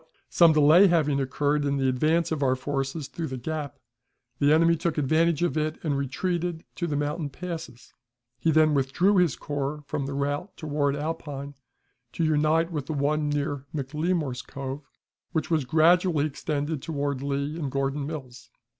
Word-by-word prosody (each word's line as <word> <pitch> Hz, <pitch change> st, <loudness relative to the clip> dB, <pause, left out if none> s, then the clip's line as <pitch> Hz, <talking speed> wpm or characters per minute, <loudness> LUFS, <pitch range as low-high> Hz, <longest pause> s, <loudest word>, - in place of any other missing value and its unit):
But, 160 Hz, -, -32 dB, 0.2 s
some 170 Hz, -2 st, +6 dB
delay 155 Hz, +6 st, +7 dB
having 150 Hz, -5 st, +2 dB
occurred 145 Hz, +2 st, 0 dB
in 140 Hz, 0 st, 0 dB
the 135 Hz, -1 st, +1 dB
advance 155 Hz, +7 st, +1 dB
of 155 Hz, -2 st, -1 dB
our 130 Hz, -2 st, +3 dB
forces 135 Hz, +2 st, -3 dB
through 165 Hz, -2 st, -5 dB
the 130 Hz, -, -5 dB
gap, 150 Hz, +1 st, -4 dB, 0.6 s
the 145 Hz, +1 st, +4 dB
enemy 165 Hz, +2 st, +5 dB
took 165 Hz, 0 st, -2 dB
advantage 160 Hz, +3 st, +2 dB
of 175 Hz, -, 0 dB
it 155 Hz, 0 st, -2 dB
and 150 Hz, -4 st, 0 dB
retreated 170 Hz, +5 st, -2 dB
to 175 Hz, -, -1 dB
the 150 Hz, -, -2 dB
mountain 145 Hz, +1 st, -2 dB
passes. 160 Hz, -7 st, -8 dB, 0.5 s
He 165 Hz, -, +1 dB
then 155 Hz, -1 st, +4 dB
withdrew 145 Hz, +9 st, +2 dB
his 175 Hz, -7 st, +3 dB
corps 145 Hz, +1 st, -4 dB
from 140 Hz, 0 st, -3 dB
the 140 Hz, -, -4 dB
route 145 Hz, +7 st, -2 dB
toward 145 Hz, -2 st, 0 dB
Alpine 145 Hz, -2 st, -5 dB, 0.6 s
to 170 Hz, -, -1 dB
unite 155 Hz, +2 st, +2 dB
with 145 Hz, -4 st, -4 dB
the 155 Hz, -, -2 dB
one 150 Hz, +1 st, 0 dB
near 145 Hz, -1 st, -2 dB
McLemore's 150 Hz, -1 st, -1 dB
Cove, 135 Hz, +1 st, -7 dB, 0.4 s
which 160 Hz, -1 st, -1 dB
was 155 Hz, -5 st, +2 dB
gradually 165 Hz, +1 st, +4 dB
extended 150 Hz, 0 st, -3 dB
toward 145 Hz, -4 st, -2 dB
Lee 140 Hz, +2 st, -2 dB
and 145 Hz, -4 st, -2 dB
Gordon's 140 Hz, +1 st, -1 dB
Mills. 130 Hz, -6 st, -8 dB
150 Hz, 170 wpm, -26 LUFS, 140-160 Hz, 0.6 s, delay